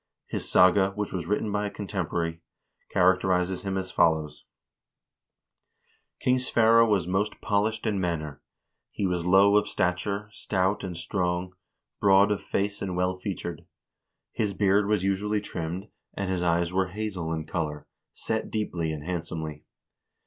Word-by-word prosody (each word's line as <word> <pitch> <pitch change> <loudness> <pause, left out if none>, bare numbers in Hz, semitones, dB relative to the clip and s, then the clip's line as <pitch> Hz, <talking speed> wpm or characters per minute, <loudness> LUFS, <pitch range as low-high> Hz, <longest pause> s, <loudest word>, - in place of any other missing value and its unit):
His - - -4
saga, 95 +2 +5
which 105 0 -3
was 85 -3 -3
written 105 +1 0
by 105 0 0
a - - -3
contemporary, 85 -5 -3 0.5
characterizes 90 0 +2
him 95 -1 -2
as 95 -1 -3
follows: 80 -3 +1 0.8
" - - -44
King 130 0 +3
Sverre 115 -2 +5
was 100 -7 +2
most 100 +3 -1
polished 110 +2 0
in 105 -3 0
manner. 75 -5 -3 0.5
He 100 - -3
was 90 -2 -1
low 100 +2 +6
of 105 - +2
stature, 100 +3 -1
stout 95 -1 -1
and 90 -3 -5
strong, 90 0 -2 0.5
broad 100 0 +5
of 105 - 0
face 100 +1 -2
and 95 -2 -3
well 90 0 0
featured. 90 -4 -5 0.6
His 105 -3 -1
beard 100 0 +3
was 105 -3 +1
usually 100 +2 0
trimmed, 90 0 -5 0.3
and 100 -2 -2
his 90 -2 -1
eyes 85 0 +1
were 95 0 +2
hazel 95 -4 -4
in 80 -1 -3
color, 75 -4 -3 0.3
set - - -3
deeply 90 -7 -2
and 75 -2 -5
handsomely. 80 -3 -4
95 Hz, 150 wpm, -27 LUFS, 85-100 Hz, 0.8 s, low